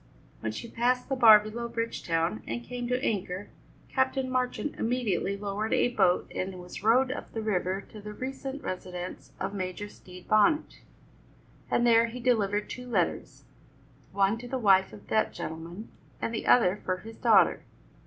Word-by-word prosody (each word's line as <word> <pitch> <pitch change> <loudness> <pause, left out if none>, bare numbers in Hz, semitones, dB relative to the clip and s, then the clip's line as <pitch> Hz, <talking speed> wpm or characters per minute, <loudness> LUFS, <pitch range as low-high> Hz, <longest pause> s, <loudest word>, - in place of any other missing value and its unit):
When 110 - -3
she 110 - -6
passed 250 +3 0
the 270 - +1
bar 225 -4 +9
below 220 +3 -5
Bridgetown 165 - -1
and 120 +1 -3
came 245 - -5
to 250 +1 0
anchor, 195 -2 -2 0.4
Captain 260 0 0
Marchand 255 +3 -1
immediately 220 -5 0
lowered 205 +2 -2
a - - +3
boat 180 -6 +2
and 185 0 -4
was 180 0 -9
rowed 250 +5 +4
up - - -6
the 225 - -3
river 190 -2 0
to 215 - -11
the 210 +1 -7
recent 270 +4 -6
residence 180 -1 -6
of 190 +1 -3
Major 190 +1 -4
Stede 180 -2 -14
Bonnet, 215 +9 +3 0.9
and 240 - +2
there 230 -1 +5
he 235 +2 -7
delivered 210 -4 +1
two 250 0 -7
letters 240 - -1 0.7
one 200 +3 +2
to 245 - -8
the 260 - -2
wife 195 -5 +4
of 105 -1 -13
that 220 - +1
gentleman, 170 +6 -7 0.3
and 230 - -2
the 220 - -3
other 205 -5 +4
for 185 0 -1
his 220 +4 -11
daughter. - - +5
215 Hz, 165 wpm, -28 LUFS, 185-245 Hz, 0.9 s, bar